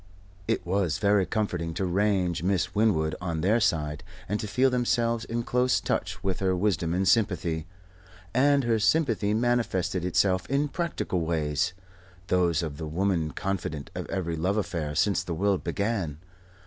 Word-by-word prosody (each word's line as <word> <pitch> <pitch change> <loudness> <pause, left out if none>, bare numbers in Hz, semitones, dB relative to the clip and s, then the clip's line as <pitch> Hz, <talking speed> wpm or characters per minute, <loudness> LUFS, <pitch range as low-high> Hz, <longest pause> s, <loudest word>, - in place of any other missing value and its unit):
It - - 0
was 90 -3 0
very 100 -1 +3
comforting 90 -6 -2
to 95 - -1
range 90 -3 +1
Miss 90 -1 0
Winwood 100 -8 +2
on 85 -3 -2
their 105 +7 +3
side; 75 -5 0 0.2
and 105 +2 -1
to 105 - -4
feel 130 +5 +2
themselves 115 -2 +1
in 120 +1 -2
close 125 +1 +2
touch 90 -1 -2
with 95 -1 -1
her 95 -1 +1
wisdom 90 -3 0
and 95 +1 +1
sympathy. 90 -6 +1 0.7
And 140 +2 +4
her 115 -2 +2
sympathy 110 -5 +2
manifested 115 -7 0
itself 90 +1 +1
in 140 +2 +1
practical 170 - -2
ways 80 +1 0 0.6
those 85 -3 +2
of 75 -3 -5
the 80 - -5
woman 85 -1 0
confidante 80 -6 -4
of - - -5
every 85 -4 -2
love 90 +6 0
affair 80 -7 -2
since 100 +5 +2
the 85 - -4
world 100 +2 +1
began. 100 -8 -2
95 Hz, 160 wpm, -27 LUFS, 85-110 Hz, 0.7 s, And